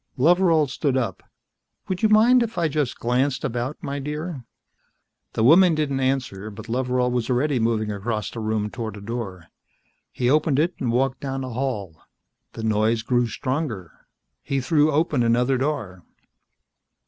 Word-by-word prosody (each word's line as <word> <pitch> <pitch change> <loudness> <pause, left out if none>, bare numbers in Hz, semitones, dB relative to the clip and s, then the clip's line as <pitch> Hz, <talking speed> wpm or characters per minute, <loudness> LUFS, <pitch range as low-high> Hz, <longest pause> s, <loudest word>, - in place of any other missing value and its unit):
Loveral 165 +2 +4
stood 135 0 -1
up. 115 -8 -2 0.7
"Would 185 -2 -3
you 220 - +4
mind 230 +4 +6
if 230 -3 -3
I 170 -2 +2
just 145 -4 -1
glanced 125 +3 0
about, 125 +5 -3
my 140 +1 -3
dear?" 150 -1 -5 0.9
The 110 - 0
woman 170 +6 +6
didn't 145 -3 -1
answer, 130 -6 -1
but 105 +3 -10
Loveral 125 +1 0
was 125 -1 -1
already 130 +2 +1
moving 110 -2 0
across 105 0 -3
the 115 - -7
room 110 -1 -1
toward 110 -3 -5
a - - -8
door. 100 -6 -6 0.6
He 125 - -1
opened 150 +1 +3
it 170 +4 +2
and 120 - -1
walked 130 +2 0
down 135 -1 -4
a 130 - -5
hall. 110 - -4 0.5
The 115 - -7
noise 110 +1 +1
grew 120 0 +1
stronger. 130 - -3 0.5
He 135 - -2
threw 150 +3 +2
open 150 -3 +1
another 125 +3 +2
door. 110 - -3
130 Hz, 160 wpm, -23 LUFS, 115-150 Hz, 0.9 s, mind